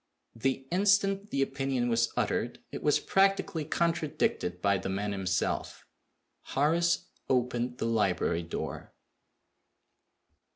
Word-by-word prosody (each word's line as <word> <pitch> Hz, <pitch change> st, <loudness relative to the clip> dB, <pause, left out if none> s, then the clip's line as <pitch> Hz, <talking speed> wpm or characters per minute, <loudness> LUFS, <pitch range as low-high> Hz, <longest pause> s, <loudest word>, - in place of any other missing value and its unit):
The 135 Hz, +3 st, -1 dB
instant 195 Hz, +1 st, +2 dB
the 135 Hz, -6 st, +1 dB
opinion 135 Hz, -2 st, -1 dB
was 115 Hz, -1 st, +2 dB
uttered, -, -, 0 dB
it -, -, -6 dB
was 150 Hz, -, +3 dB
practically 195 Hz, -3 st, +2 dB
contradicted 155 Hz, -, 0 dB
by 100 Hz, 0 st, +2 dB
the -, -, -4 dB
man 100 Hz, +2 st, -2 dB
himself. 95 Hz, -2 st, -2 dB, 0.6 s
Horace 170 Hz, +5 st, +1 dB, 0.2 s
opened 125 Hz, -1 st, 0 dB
the -, -, -2 dB
library 100 Hz, -7 st, +1 dB
door. 85 Hz, -1 st, -6 dB
135 Hz, 110 wpm, -30 LUFS, 105-170 Hz, 0.6 s, was